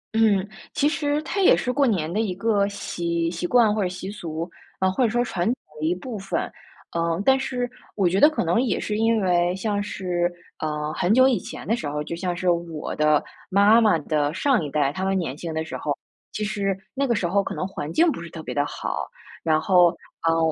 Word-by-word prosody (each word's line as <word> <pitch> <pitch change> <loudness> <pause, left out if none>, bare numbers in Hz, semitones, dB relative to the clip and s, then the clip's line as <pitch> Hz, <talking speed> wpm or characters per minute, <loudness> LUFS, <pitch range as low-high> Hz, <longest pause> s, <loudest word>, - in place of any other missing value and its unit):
嗯， 210 -3 +3 0.3
其 290 - +2
实 295 -1 0
它 395 +5 -2
也 375 - +6
是 250 - -1
过 280 -2 +3
年 170 -7 0
的 205 - -1
一 200 -5 -1
个 200 -1 +2
习 170 -4 -2
习 175 0 -3
惯 225 -1 +4
或 215 - 0
者 180 - 0
习 185 +2 -6
俗， 165 -5 -5 0.3
啊， 190 0 +2
或 250 +7 +1
者 230 - +3
说 240 +2 +1
传 175 -7 -2
统 240 - +2 0.2
的 155 - -2
一 175 - +1
部 220 +3 -6
分。 195 0 -2 0.5
呃， 170 0 0
但 265 0 +5
是 250 -2 -2 0.3
我 195 -4 +2
觉 185 +3 +2
得 295 - +8
可 310 - -2
能 175 +8 +2
也 250 - 0
是 210 - -2
因 225 +1 +2
为 175 -1 +2
像 205 +1 -1
是， 180 -3 -1 0.3
呃， 150 0 -2
很 175 - 0
久 260 +4 +6
以 255 -4 +2
前 - - -9
的 225 - +2
时 155 -11 -4
候， 150 +1 -3
就 170 - -5
像 175 0 -3
是 180 0 +2
我 170 -3 -3
的 150 -1 +3 0.3
妈 205 +4 +6
妈 210 -6 +4
的 150 -1 0
上 260 - +2
一 150 - -4
代， 140 0 +1
她 185 - -4
们 195 0 +1
年 150 -7 -2
轻 165 +1 -5
的 160 0 -2
时 - - -7
候， 145 -2 -2 0.3
其 210 - -3
实 200 -2 -1 0.2
那 275 0 0
个 235 - +2
时 185 - 0
候 200 +3 +2
可 - - -5
能 185 - -2
环 155 -6 -5
境 330 - +4
不 170 - -6
是 170 - -8
特 160 -1 -8
别 - - -5
地 145 - +2
好。 - - -4 0.3
然 155 -2 +2
后， 180 0 +5 0.4
嗯， 165 - +3
185 Hz, 255 characters per minute, -24 LUFS, 165-225 Hz, 0.5 s, 得